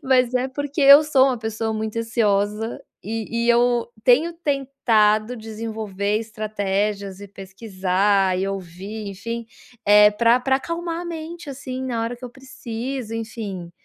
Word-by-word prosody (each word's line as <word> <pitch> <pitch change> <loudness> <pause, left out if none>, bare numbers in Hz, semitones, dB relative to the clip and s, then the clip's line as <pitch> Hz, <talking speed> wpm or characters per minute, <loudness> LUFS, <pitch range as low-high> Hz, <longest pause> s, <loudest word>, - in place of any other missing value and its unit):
Mas 255 -2 +3
é 255 +1 +1
porque 285 +2 -4
eu 280 +2 +9
sou 270 -3 +4
uma 260 - +1
pessoa 220 0 -3
muito 220 +1 -3
ansiosa 215 -1 0 0.2
e 225 +2 -3
e - - 0
eu 240 0 +3 0.2
tenho 285 +9 +4
tentado 250 -8 +1
desenvolver 215 -2 -3
estratégias 205 -2 -2
e 205 - -9
pesquisar 195 -1 0
e 190 +1 -1
ouvir, 195 +3 -6
enfim, 230 +4 -5 0.4
eh, 210 0 +7
pra 235 +3 +3
pra 265 +1 +2
acalmar 335 +3 -4
a - - -8
mente 330 -2 -7
assim 260 -1 -6
na 240 -3 -2
hora 235 +2 -3
que 250 - -11
eu 245 - -7
preciso, 250 -2 -6
enfim. 215 -6 -6
225 Hz, 145 wpm, -22 LUFS, 205-260 Hz, 0.4 s, eu